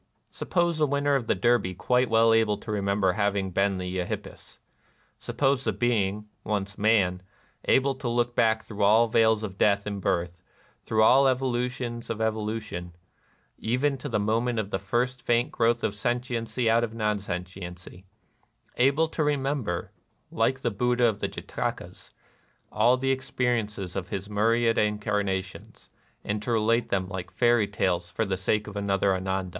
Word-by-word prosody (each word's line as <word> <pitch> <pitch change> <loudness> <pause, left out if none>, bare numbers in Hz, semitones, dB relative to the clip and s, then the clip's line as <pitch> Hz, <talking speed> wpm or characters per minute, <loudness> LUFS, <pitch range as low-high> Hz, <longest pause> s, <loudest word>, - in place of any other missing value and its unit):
Suppose 170 -3 0
the 150 - +3
winner 140 +1 +1
of 130 -5 0
the - - +2
Derby 120 -6 +1
quite 125 +5 +1
well 115 0 +4
able 110 -2 +2
to 110 - -8
remember 100 -2 +1
having 100 -1 0
been 95 +1 +1
the 90 0 -4
Eohippus? 90 - -6 0.6
Suppose 135 -2 0
the 110 - +1
being, 105 -1 0 0.2
once 100 -1 -3
man, 100 -4 +2 0.4
able 135 +1 +3
to 130 -2 -4
look 120 0 0
back 110 -1 +2
through 105 -2 -7
all 110 +3 +5
veils 110 -1 +3
of 95 -3 -6
death 100 -1 +3
and 100 -1 -4
birth, 90 0 -1 0.4
through 110 0 +1
all 135 +4 +6
evolutions 125 -2 -2
of 115 - -3
evolution, 110 -5 -3 0.6
even 130 +5 0
to 145 - -5
the 115 - 0
moment 115 +3 0
of 105 -2 -2
the 95 - -1
first 120 +6 -1
faint 120 +1 +1
growth 115 0 +1
of - - 0
sentiency 120 +1 -2
out 115 +1 +4
of 115 -1 -4
non 105 -2 0
sentiency; 90 -1 -7 0.4
— - - -38
able 155 +4 +2
to 160 - -1
remember, 135 -10 -1 0.4
like 130 +4 0
the - - +1
Buddha 125 +3 +1
of 110 -3 +1
the - - -1
Jatakas, - - -5 0.6
aU 115 +4 +4
the 135 +1 0
experiences 115 -7 -2
of 95 -2 -4
his 100 0 -4
myriad 115 +2 +2
incarnations, 105 -3 -2 0.3
and 105 0 -2
to 120 - -3
relate 115 +1 +2
them 95 -1 0
like 95 -2 -6
fairy 120 -3 +2
tales 90 -4 -1
for 110 - -2
the 95 -2 -1
sake 105 +3 0
of 105 - -9
another 100 -1 +1
Ananda 95 0 -2
110 Hz, 165 wpm, -26 LUFS, 100-120 Hz, 0.6 s, all